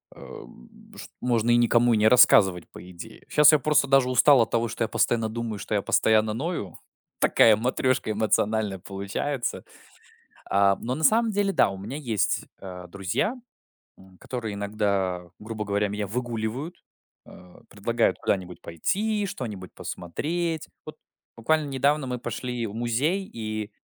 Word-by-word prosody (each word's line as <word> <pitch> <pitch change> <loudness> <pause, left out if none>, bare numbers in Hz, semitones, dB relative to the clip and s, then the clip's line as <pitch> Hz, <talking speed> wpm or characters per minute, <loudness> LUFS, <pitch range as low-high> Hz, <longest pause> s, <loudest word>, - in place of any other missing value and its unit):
эм, - - -14
ш - - -9
можно 120 -2 +1
и 120 - +5
никому 120 0 +3
и - - +3
не 105 +1 +4
рассказывать 95 -7 +5
по 90 - -12
идее. 85 -2 -12
Щас 150 0 +6
я 155 - +4
просто 145 0 +2
даже 135 -2 +3
устал 130 +1 +5
от 115 - -1
того, 115 0 +1
что 115 +1 -3
я 115 - 0
постоянно 115 -2 0
думаю, 110 -2 -5
что 105 - -5
я 100 - +2
постоянно 110 +1 +2
ною. 125 - -4 0.4
Такая 110 -2 +5
матрёшка 125 0 0
эмоциональная 105 -2 0
получается. 100 +8 -4 0.8
А, 100 0 +3
но 125 +2 -3
на 160 - -5
самом 225 +4 +4
деле, 200 -1 0
да, - - +4
у 95 - -7
меня 100 +9 -6
есть, 115 -9 -1
э, 90 -2 -9
друзья, 100 - -2 0.6
м, 95 -1 -19
которые 115 -5 -5
иногда, 100 -3 -2
грубо 110 0 -6
говоря, 105 0 0
меня 105 0 -4
выгуливают, 120 - -4 0.5
э, 90 0 -16
предлагают 115 +3 0
куда-нибудь 90 -2 -2
пойти, 205 - -1
что-нибудь 105 - -7
посмотреть. 160 - -4 0.2
Вот - - -9 0.4
буквально 155 +6 +1
недавно 140 +2 +1
мы 125 -1 -4
пошли 125 -1 -4
в 105 - -9
музей 130 - -1
и 110 -1 -5
115 Hz, 155 wpm, -25 LUFS, 100-130 Hz, 0.8 s, Щас